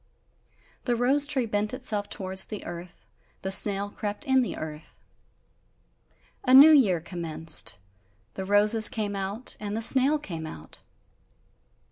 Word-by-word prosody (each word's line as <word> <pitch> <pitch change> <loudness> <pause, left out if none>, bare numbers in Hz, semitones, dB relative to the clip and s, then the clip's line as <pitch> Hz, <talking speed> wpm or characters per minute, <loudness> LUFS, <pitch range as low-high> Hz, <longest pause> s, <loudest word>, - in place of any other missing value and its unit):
The 245 - 0
rose 270 +5 +2
tree 270 -5 -1
bent 210 +1 -3
itself 215 -6 -3
towards 190 0 -2
the 210 - -8
earth, 170 -7 -10 0.4
the 190 - -3
snail 200 +1 +2
crept 210 +8 -6
in 265 -2 +2
the 245 - -5
earth. 155 0 -10 1.4
A 255 0 +4
new 290 +4 +9
year 215 - +3
commenced; 160 - -2 0.6
the 190 - -6
roses 210 +3 +4
came 205 -2 -4
out, 200 +5 -2
and 210 0 -5
the - - -3
snail 270 +5 +5
came 165 - -8
out. 80 - -12
205 Hz, 135 wpm, -25 LUFS, 185-250 Hz, 1.4 s, new